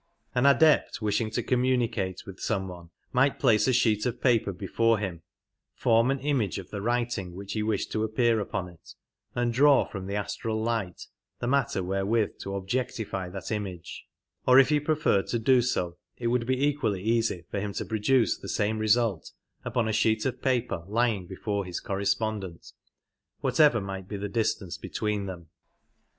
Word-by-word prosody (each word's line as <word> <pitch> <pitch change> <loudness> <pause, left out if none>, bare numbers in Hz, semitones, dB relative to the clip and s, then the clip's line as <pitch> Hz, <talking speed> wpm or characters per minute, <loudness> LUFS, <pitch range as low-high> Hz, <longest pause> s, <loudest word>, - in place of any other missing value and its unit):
An 125 +2 +3
Adept 155 +2 +4
wishing 110 +1 0
to 110 - -2
communicate 120 -7 0
with 95 -1 -10
some 95 -3 -1
one 85 -2 -10 0.2
might 135 +2 +3
place 110 +1 +3
a - - +4
sheet 110 -4 +2
of 120 - -3
paper 115 -6 +2
before 110 +5 +1
him, 95 -5 -4 0.5
form 115 +2 +3
an 135 - +1
image 130 - 0
of 95 -2 -8
the 100 - -4
writing 120 -5 -1
which 100 +1 -6
he 110 - -1
wished 105 -2 -1
to 110 - 0
appear 110 +1 +2
upon 95 -2 -3
it, 85 -2 -15 0.4
and 120 -1 0
draw 140 +2 +5
from 95 -2 -7
the 100 - -3
astral 110 +2 -2
light 110 -5 -2 0.3
the - - -4
matter 125 -7 +1
wherewith 95 +4 0
to 100 0 -5
objectify 100 -2 -3
that 95 +2 -7
image; 95 -5 -5 0.4
or 130 0 +7
if 135 -1 +7
he 150 -1 +3
preferred 150 -9 +1
to 120 - 0
do 125 +2 +4
so 90 -8 -1 0.2
it 120 - -6
would 120 -1 0
be 130 +2 +1
equally 110 -10 0
easy 115 -6 0
for 100 - -1
him 100 0 -3
to - - -3
produce 115 +3 +2
the - - -9
same 110 +1 0
result 110 -4 +1 0.3
upon 120 -3 0
a 110 - 0
sheet 110 0 +2
of 130 - -2
paper 125 -9 0
lying 110 -3 0
before 100 +2 -3
his 90 -2 -5
correspondent, 100 -2 -2 0.7
whatever 150 -7 +4
might 95 -2 -6
be 105 - -5
the - - -8
95 105 - -4
distance 95 -6 -1
between 105 -2 -2
them. 85 -4 -8
110 Hz, 180 wpm, -27 LUFS, 95-120 Hz, 0.7 s, or